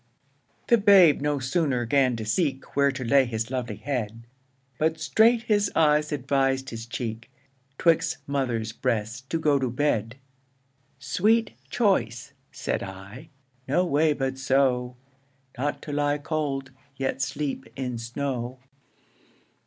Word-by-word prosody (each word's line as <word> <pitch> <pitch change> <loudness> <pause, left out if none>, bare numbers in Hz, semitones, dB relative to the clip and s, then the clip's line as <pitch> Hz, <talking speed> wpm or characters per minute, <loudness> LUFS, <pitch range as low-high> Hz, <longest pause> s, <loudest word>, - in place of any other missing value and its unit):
The 235 -2 +4
babe 190 -8 +6
no 145 0 0
sooner 130 -2 0
'gan 130 0 +2
to 110 -1 -5
seek 135 - -1
Where 140 0 +4
to 135 -1 -5
lay 135 +3 +4
his 115 0 -3
lovely 120 -5 -3
head, 115 -3 -4 0.5
But 160 +1 +1
straight 225 +9 +3
his 205 -2 +1
eyes 150 -1 +3
advis'd 135 -1 0
his 115 0 -7
cheek, 115 -1 -5 0.5
'Twixt 165 -1 +2
mother's 125 -6 -1
breasts 115 -1 -2
to 165 - 0
go 150 -3 +2
to 130 -2 -1
bed. 120 -3 0 0.8
Sweet 215 - +1 0.2
choice 190 - 0 0.2
(said - - -3
I) 100 - -9 0.4
no 175 +7 +2
way 155 -1 +2
but 135 -2 -3
so, 130 -2 +1 0.6
Not 145 +3 -3
to 145 - -6
lie 145 0 +1
cold, 145 -3 -3 0.2
yet 135 0 -2
sleep 135 +1 -3
in 125 -3 -4
snow. 125 +1 -4
135 Hz, 130 wpm, -26 LUFS, 120-150 Hz, 0.8 s, babe